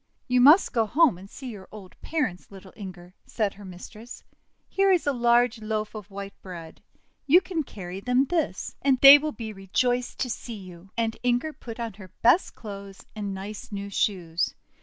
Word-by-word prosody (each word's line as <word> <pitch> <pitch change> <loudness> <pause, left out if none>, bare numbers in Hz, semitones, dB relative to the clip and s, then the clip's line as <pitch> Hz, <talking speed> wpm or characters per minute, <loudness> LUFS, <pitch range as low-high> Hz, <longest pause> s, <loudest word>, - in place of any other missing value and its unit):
'You 250 0 +3
must 300 +9 +7
go 225 -3 +2
home 275 - +3
and 195 +1 -12
see 260 +1 -8
your 195 -4 -11
old 200 -4 -11
parents, 295 - -2
little 190 -1 -13
Inger," 180 -3 -10
said 210 -4 -1
her 205 - -13
mistress. 210 +6 -11 0.4
"Here 390 0 +2
is 360 -3 +2
a 285 - +2
'large 240 -1 +3
loaf 215 0 -3
of 215 -2 -9
white 200 0 -7
bread 170 -4 -10 0.2
— - - -44
you 325 +6 +7
can 360 -3 -3
carry 190 -8 -7
them 250 +5 +2
this. 315 - -2 0.2
They 275 +2 +11
will 305 +1 -3
be 225 -5 -7
rejoiced 245 +6 -1
to 255 - -1
see 230 +1 -6
you." 185 -1 -12
And 225 -1 -1
Inger 245 +5 0
put 235 -4 -10
on 230 -2 -4
her 190 - -10 0.2
best 245 +11 +4
clothes 200 -3 -9
and 200 -2 -4
nice 210 +5 -8
new 200 0 -5
shoes. 175 -5 -1
215 Hz, 185 wpm, -26 LUFS, 195-250 Hz, 0.4 s, They